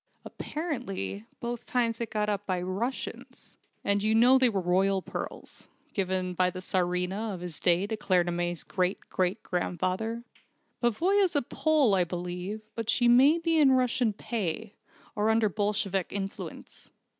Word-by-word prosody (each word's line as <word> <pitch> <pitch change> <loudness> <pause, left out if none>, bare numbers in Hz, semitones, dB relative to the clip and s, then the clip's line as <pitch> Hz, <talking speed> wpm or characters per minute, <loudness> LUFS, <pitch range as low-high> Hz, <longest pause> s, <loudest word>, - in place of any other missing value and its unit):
Apparently 195 - -4
both 240 0 -4
times 235 -2 0
it 230 - -2
was - - -14
got 210 -1 0
up 205 -1 -2
by 185 -2 0
Russians. 195 +9 -4 0.3
And 200 0 +2
you 215 +1 +2
know 250 +4 +6
they 255 -1 +5
were 200 -4 -1
royal 190 +2 +2
pearls, - - -7 0.2
given 185 -2 -1
by 180 +1 +2
the 185 0 -7
Tsarina 185 +3 -1
of 175 - -9
his 175 -3 -6
day 175 +2 +3
to 220 +2 -3
Claremanagh's 175 -4 0
great 185 0 -1
great 185 +4 0
grandfather. 185 +6 -2 0.6
Pavoya's 355 - +2
a 285 - +2
Pole, 295 -4 +2
I 185 -2 +4
believe, 180 +4 -5
but 230 -1 -4
she 240 +1 +3
may 265 +7 +6
be 330 -1 +1
in 275 -3 +6
Russian 250 -2 +2
pay, 215 -1 -4 0.4
or 210 +1 +1
under 220 -1 +3
Bolshevik 200 -2 -1
influence. 195 0 -6
205 Hz, 155 wpm, -28 LUFS, 180-235 Hz, 0.6 s, know